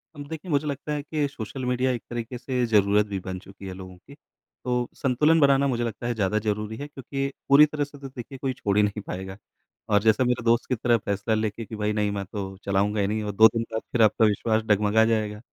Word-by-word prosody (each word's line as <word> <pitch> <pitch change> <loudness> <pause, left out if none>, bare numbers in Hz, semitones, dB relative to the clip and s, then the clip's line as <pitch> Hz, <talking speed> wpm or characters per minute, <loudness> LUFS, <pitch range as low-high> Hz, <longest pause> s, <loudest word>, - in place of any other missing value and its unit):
अब 145 -1 -8
देखिए 160 +3 -7
मुझे 145 +1 +1
लगता 140 +1 -4
है 145 - -2
कि 150 0 -1
सोशल 125 -1 -6
मीडिया 125 +1 +1
एक 120 -2 -3
तरीके 120 +1 -5
से 125 0 -1
ज़रूरत 105 -2 +3
भी 100 -2 -4
बन 95 0 -6
चुकी 95 0 -13
है 95 - -5
लोगों 95 -1 -10
की। 135 +10 -16 0.5
तो 125 -1 0
संतुलन 150 +5 +3
बनाना 140 -1 +4
मुझे 120 -3 0
लगता 115 0 -4
है 120 - 0
ज़्यादा 105 -1 0
ज़रूरी 105 +1 -3
है 145 - -6
क्योंकि 135 -1 -4 0.2
पूरी 140 +2 +8
तरह 150 -1 -2
से 145 0 -9
तो 135 - -7
देखिए 130 +1 -9
कोई 130 0 -2
छोड़ 100 -4 -1
ही 105 - +5
नहीं 105 +1 -1
पाएगा, 95 +1 -6 0.5
और 105 -1 +4
जैसा 110 +2 +4
मेरा 125 -2 0
दोस्त 115 +1 +3
की 130 - +2
तरह 120 +1 +2
फ़ैसला 100 +1 -2
लेके 110 +1 -2
कि 110 - -8
भई, 105 0 -1
नहीं, 105 -1 0
मैं 100 -1 -3
तो 95 0 -6
चलाऊँगा 100 +2 +1
ही 100 - +1
नहीं, 110 +1 -1
और 105 - -3
2 110 +3 +7
दिन 115 - 0
बाद 110 0 -2
फिर 120 - +1
आपका 110 +1 +5
विश्वास 110 +1 +1
डगमगा 105 +1 +3
जाएगा, 110 -2 -1
110 Hz, 245 wpm, -25 LUFS, 105-130 Hz, 0.5 s, पूरी